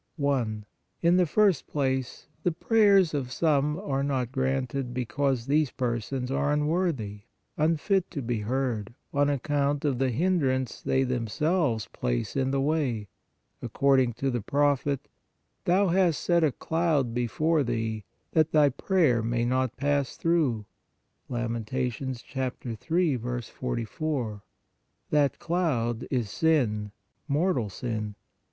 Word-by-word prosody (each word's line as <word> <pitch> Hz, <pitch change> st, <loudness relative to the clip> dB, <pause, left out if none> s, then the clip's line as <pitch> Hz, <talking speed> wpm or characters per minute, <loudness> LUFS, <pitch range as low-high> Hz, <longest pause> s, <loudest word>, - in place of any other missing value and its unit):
i. 120 Hz, -6 st, 0 dB, 0.5 s
In 170 Hz, +2 st, +5 dB
the 180 Hz, -2 st, +3 dB
first 200 Hz, -3 st, +3 dB
place, 130 Hz, -3 st, -2 dB, 0.2 s
the 175 Hz, -, +1 dB
prayers 195 Hz, -1 st, +4 dB
of 135 Hz, -4 st, -2 dB
some 150 Hz, +1 st, +1 dB
are 135 Hz, -9 st, -1 dB
not 130 Hz, -4 st, -1 dB
granted, 130 Hz, -1 st, -1 dB
because 130 Hz, 0 st, 0 dB
THESE 145 Hz, +1 st, +2 dB
PERSONS 125 Hz, +1 st, -2 dB
ARE 145 Hz, +1 st, +1 dB
UNWORTHY, 150 Hz, -, -1 dB, 0.3 s
UNFIT 165 Hz, +5 st, +1 dB
TO 140 Hz, -6 st, -5 dB
BE 115 Hz, -1 st, -1 dB
HEARD, 120 Hz, -2 st, -2 dB, 0.2 s
on 145 Hz, 0 st, +3 dB
account 145 Hz, +1 st, 0 dB
of 135 Hz, -4 st, 0 dB
the 135 Hz, -1 st, +2 dB
hindrance 130 Hz, -3 st, 0 dB
they 135 Hz, -, +1 dB
themselves 125 Hz, -, 0 dB
place -, -, -2 dB
in 130 Hz, -1 st, +1 dB
the 135 Hz, 0 st, 0 dB
way, 135 Hz, -8 st, 0 dB, 0.5 s
according 135 Hz, -3 st, +2 dB
to 135 Hz, +4 st, -1 dB
the 120 Hz, -2 st, -1 dB
prophet: 145 Hz, +2 st, +1 dB, 0.3 s
" -, -, -48 dB
Thou 185 Hz, +2 st, +3 dB
hast 175 Hz, -3 st, +3 dB
set 170 Hz, -1 st, +3 dB
a 155 Hz, -, +3 dB
cloud 155 Hz, -6 st, 0 dB
before 150 Hz, +7 st, +1 dB
thee, 115 Hz, -3 st, -2 dB, 0.3 s
that 160 Hz, -1 st, +2 dB
thy 150 Hz, -2 st, +6 dB
prayer 140 Hz, -, +2 dB
may 120 Hz, +1 st, 0 dB
not 130 Hz, 0 st, 0 dB
pass 140 Hz, -1 st, 0 dB
through 150 Hz, -11 st, +1 dB, 0.3 s
" -, -, -47 dB
(Lament. 115 Hz, -3 st, -3 dB
3. 130 Hz, -, -2 dB
44). 120 Hz, 0 st, -3 dB, 0.7 s
That 145 Hz, -3 st, +3 dB
cloud 130 Hz, -10 st, -1 dB
is 120 Hz, -7 st, -1 dB
sin, 115 Hz, -11 st, +1 dB, 0.4 s
mortal 145 Hz, -, +1 dB
sin. 110 Hz, -1 st, -4 dB
135 Hz, 130 wpm, -27 LUFS, 120-155 Hz, 0.7 s, thy